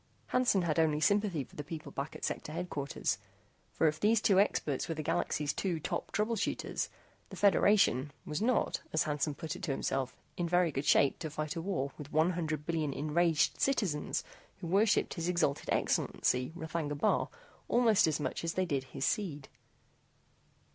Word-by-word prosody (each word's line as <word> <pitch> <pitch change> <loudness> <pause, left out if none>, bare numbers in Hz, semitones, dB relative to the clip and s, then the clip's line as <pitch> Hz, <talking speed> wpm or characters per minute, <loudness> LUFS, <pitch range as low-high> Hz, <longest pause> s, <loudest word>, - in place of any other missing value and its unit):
Hansen 245 -7 +3
had 165 -1 +1
only 155 -2 +3
sympathy 200 -2 +2
for - - -18
the 145 - -5
people 155 +1 -7
back 140 +2 -5
at - - -4
Sector 150 - -4
Headquarters, 160 -9 -2 0.5
for 160 - +2
if 155 0 0
these 220 +3 +4
two 195 -3 +4
experts 150 -9 +1
were 165 - -1
the 155 - -4
Galaxy's 150 0 0
two 180 -4 -1
top - - -3
trouble 215 +2 0
shooters, 210 - -2 0.4
the - - -8
Federation, 195 - +4
was 150 +5 -3
not, 245 +2 +1
as 160 - +3
Hansen 150 0 -1
put 160 +2 -5
it - - -9
to 170 - -4
himself, 135 -1 -2 0.2
in 175 -1 -1
very 175 -1 +3
good 135 +1 -3
shape 140 - +4
to 155 - -4
fight 155 +2 -4
a 165 - -3
war 140 -7 -2
with 145 0 -8
one 160 +4 +3
hundred 155 -4 -3
billion 160 -3 -1
enraged 155 +2 +1
citizens 200 - 0 0.4
who 185 - -7
worshiped 200 +5 +2
His 170 -1 -2
Exalted 170 -5 0
Excellency 125 +2 +1
R'thagna 160 -3 -3
Bar - - +2 0.4
almost 230 -7 +4
as 155 -1 0
much 150 - -3
as 165 0 -1
they 185 - +1
did 140 -6 -1
his 130 - -4
seed. 160 - -2
160 Hz, 180 wpm, -32 LUFS, 150-185 Hz, 0.5 s, these